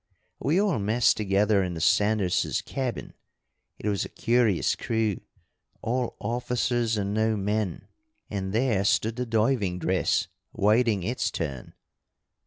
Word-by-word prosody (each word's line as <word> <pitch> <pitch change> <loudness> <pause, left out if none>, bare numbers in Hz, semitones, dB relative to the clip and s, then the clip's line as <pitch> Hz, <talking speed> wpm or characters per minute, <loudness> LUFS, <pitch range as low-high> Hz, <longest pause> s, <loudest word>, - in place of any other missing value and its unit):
We 155 +7 +1
all 200 - +1
messed 110 +4 +3
together 100 0 +2
in 90 -2 -2
the - - -5
Sanderses' 105 +1 +1
cabin 130 -4 -4 0.6
it - - -5
was 100 -2 0
a - - -6
curious 115 -6 +1
crew, 110 -4 -1 0.6
all 125 +1 -1
officers 120 0 -1
and 100 0 -1
no 110 0 +1
men 105 -2 -2 0.4
and 95 -2 -4
there 110 -3 +1
stood 110 +2 +1
the 125 0 -3
diving 110 -4 +1
dress 95 +2 +1 0.3
waiting 110 -1 +2
its 110 0 -1
turn. 70 -10 -5
110 Hz, 130 wpm, -26 LUFS, 100-120 Hz, 0.6 s, messed